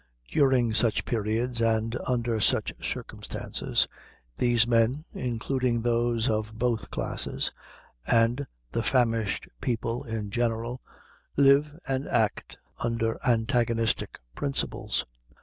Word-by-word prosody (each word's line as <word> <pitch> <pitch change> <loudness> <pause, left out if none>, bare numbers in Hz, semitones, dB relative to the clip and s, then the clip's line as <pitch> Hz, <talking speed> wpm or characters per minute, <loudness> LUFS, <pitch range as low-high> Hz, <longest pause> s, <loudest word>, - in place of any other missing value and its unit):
During 130 -5 +3
such 115 0 +1
periods, 115 +2 -1
and 115 0 +1
under 120 -3 0
such 105 - +2
circumstances, - - -2 0.5
these 120 -2 +3
men 120 +5 +2
including 125 0 -1
those 120 0 +1
of 110 -1 -1
both 115 -4 0
classes - - -1 0.6
and 120 +4 +3 0.2
the - - 0
famished 115 -4 +1
people, 115 +1 -1
in 110 -5 -4
general, 120 +1 -1 0.6
live 140 +2 +5
and 135 0 -1
act - - 0 0.2
under 115 -1 -1
antagonistic 115 -1 +1 0.2
principles. 140 -1 -2
115 Hz, 100 wpm, -28 LUFS, 115-125 Hz, 0.6 s, live